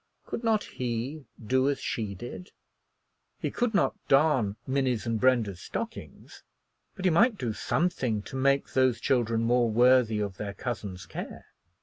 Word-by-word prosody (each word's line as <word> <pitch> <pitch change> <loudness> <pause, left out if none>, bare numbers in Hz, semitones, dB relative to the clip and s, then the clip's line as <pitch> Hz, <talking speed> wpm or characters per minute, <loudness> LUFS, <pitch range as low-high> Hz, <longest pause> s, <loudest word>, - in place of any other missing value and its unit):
Could 235 - -5
not 220 -2 +2
he 125 +4 -4 0.2
do 130 +4 +2
as 145 - 0
she 105 -4 -3
did? 120 - -8 0.9
He - - -3
could 240 -3 -1
not 200 - +3
darn 135 -8 +3
Minnie's 130 -4 0
and 115 -1 -1
Brenda's 115 -8 +2
stockings, 230 0 -7 0.5
but 190 -3 -6
he 185 - +5
might 215 +7 +4
do 120 - -2
something 125 -4 -1
to - - -9
make 140 +1 +1
those 130 -3 +3
children 115 -3 +1
more 120 0 +3
worthy 120 -1 +4
of 100 -2 -3
their 100 -1 -5
cousin's 100 -7 -5
care. - - -8
125 Hz, 150 wpm, -28 LUFS, 110-140 Hz, 0.9 s, he